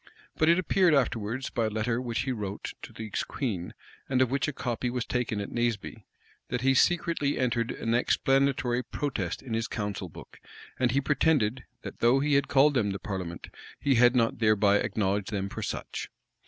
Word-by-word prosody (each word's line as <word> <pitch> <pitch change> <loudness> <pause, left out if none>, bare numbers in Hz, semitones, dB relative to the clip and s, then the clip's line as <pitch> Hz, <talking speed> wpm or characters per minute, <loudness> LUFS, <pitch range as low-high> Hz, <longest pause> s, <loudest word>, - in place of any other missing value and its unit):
[] - - -29
But 155 - +4
it 170 - +6
appeared 185 -2 +3
afterwards, 120 -1 -1
by 115 - 0
a - - 0
letter 115 +3 -1
which 120 -2 -2
he 130 - -2
wrote 105 -4 -4
to - - -9
the 110 - -7 0.2
queen, 100 -10 -3 0.3
and 130 -1 +2
of 130 -1 +3
which 135 0 0
a - - -1
copy 125 -2 -2
was 125 -1 -2
taken 125 -4 -1
at 100 - -5
Naseby, 120 -3 -2 0.4
that 125 - -2
he 135 +1 +4
secretly 165 -1 +2
entered 120 -2 0
an 115 - -2
explanatory 130 0 +2
protest 140 +3 -3
in 125 -4 -6
his 115 0 -1
council 105 -4 -4
book; - - -13 0.4
and 125 -1 +3
he 135 +3 +2
pretended, 140 -5 +1 0.2
that - - -8
though 120 +3 +4
he 145 +1 +1
had 140 0 +3
called 145 +2 +4
them 115 -6 +1
the 100 - -2
parliament, 90 -4 -5 0.3
he 140 - +2
had 120 +1 +5
not 115 -2 +2
thereby 105 -2 +4
acknowledged 100 -1 -1
them 100 -2 -2
for - - -6
such. - - -4
120 Hz, 195 wpm, -28 LUFS, 110-135 Hz, 0.4 s, it